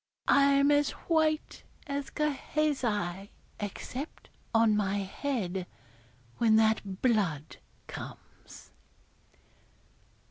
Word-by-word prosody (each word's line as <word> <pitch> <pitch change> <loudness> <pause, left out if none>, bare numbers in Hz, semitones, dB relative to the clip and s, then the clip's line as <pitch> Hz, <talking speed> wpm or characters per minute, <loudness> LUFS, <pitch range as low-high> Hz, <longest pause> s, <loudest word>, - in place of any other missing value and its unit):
I'm 280 0 +5
as 290 0 +4 0.2
white 315 -2 +1 0.2
as 280 -1 -3
Gehazi, 260 - -1 0.3
except 250 +8 -6 0.2
on 225 -2 +4
my 200 -1 +1
head, 195 -3 -2 0.7
when 225 -2 +5
that 220 -3 +1
blood 195 - +1 0.3
comes.' - - -11
230 Hz, 75 wpm, -30 LUFS, 200-285 Hz, 0.7 s, I'm